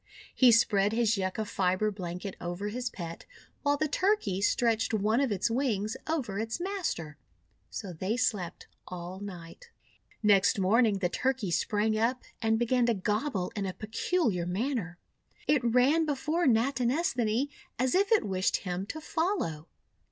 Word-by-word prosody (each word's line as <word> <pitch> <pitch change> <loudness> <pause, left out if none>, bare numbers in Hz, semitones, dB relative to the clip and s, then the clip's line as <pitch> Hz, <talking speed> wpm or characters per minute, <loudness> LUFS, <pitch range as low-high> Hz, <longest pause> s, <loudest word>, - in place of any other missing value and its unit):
He 255 -2 +6
spread 210 -3 +3
his 225 -1 +2
Yucca 195 +2 -2
fibre 190 +1 +1
blanket 185 0 -6
over 175 +4 -3
his 245 +3 -3
pet, 170 -7 -8 0.3
while 285 0 +2
the 310 +1 0
Turkey 365 - +1
stretched 225 +1 +2
one 215 +4 +2
of 270 -5 +1
its 205 +3 0
wings 225 -4 0
over 260 -11 -2
its 225 +6 -3
master. 340 - -3 0.5
So 195 -4 -6
they 190 +8 -2
slept 205 -8 -1 0.2
all 180 +1 -7
night. 195 - -9 0.5
Next 200 -1 +4
morning 210 +2 +3
the 180 -2 0
Turkey 255 -4 -1
sprang 215 +5 +1
up 245 +3 0 0.2
and 225 -1 +2
began 240 +1 +2
to 235 - +2
gobble 205 0 -1
in 200 -2 -2
a 185 - -3
peculiar 220 - -1
manner. 195 -2 -2 0.5
It 290 -4 +2
ran 255 +7 +3
before 305 +4 0
Natinesthani 250 - +1 0.3
as 255 +1 +1
if 395 +2 +2
it 445 - +4
wished 190 -1 +1
him 180 +1 -4
to 315 - -6
follow. 315 - -2
220 Hz, 150 wpm, -29 LUFS, 190-260 Hz, 0.5 s, He